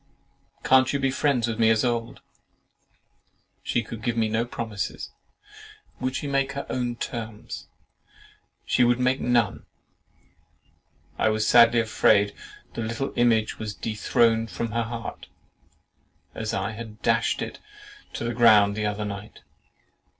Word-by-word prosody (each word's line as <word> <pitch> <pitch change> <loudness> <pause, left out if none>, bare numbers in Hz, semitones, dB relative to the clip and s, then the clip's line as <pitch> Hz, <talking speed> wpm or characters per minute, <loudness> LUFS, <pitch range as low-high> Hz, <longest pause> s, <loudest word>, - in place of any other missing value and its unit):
"Can't 130 0 +4
you - - +2
be 135 -1 +1
friends 130 -4 +1
with 115 0 -3
me 110 -1 +5
as 110 -1 +3
of 120 - +3
old?" 115 0 -5 1.4
"She 120 - -1
could 115 -1 -8
give 120 +1 -2
no 110 +1 +1
promises." 110 -4 -5 0.9
"Would 130 +1 -2
she - - -3
make 140 -1 0
her 140 - -5
own 120 -1 -2
terms?" 110 -3 -6 1.0
"She 130 - +3
would 120 0 +3
make 130 +1 +1
none."—"I 120 -1 -5
was 110 0 0
sadly 120 -1 +6
afraid 105 -2 +3 0.4
the - - -4
LITTLE 115 +5 -3
IMAGE 115 -2 +2
was 105 -1 -5
dethroned 115 +1 +1
from 115 0 -4
her 115 +2 0
heart, 115 0 -6 1.1
as - - -4
I - - -2
had 110 -1 -10
dashed - - +1
it - - -7 0.5
to - - -4
the 120 0 -2
ground 110 -4 +5
the 105 0 -1
other 105 0 -3
night." 100 0 -8
115 Hz, 135 wpm, -25 LUFS, 110-120 Hz, 1.4 s, sadly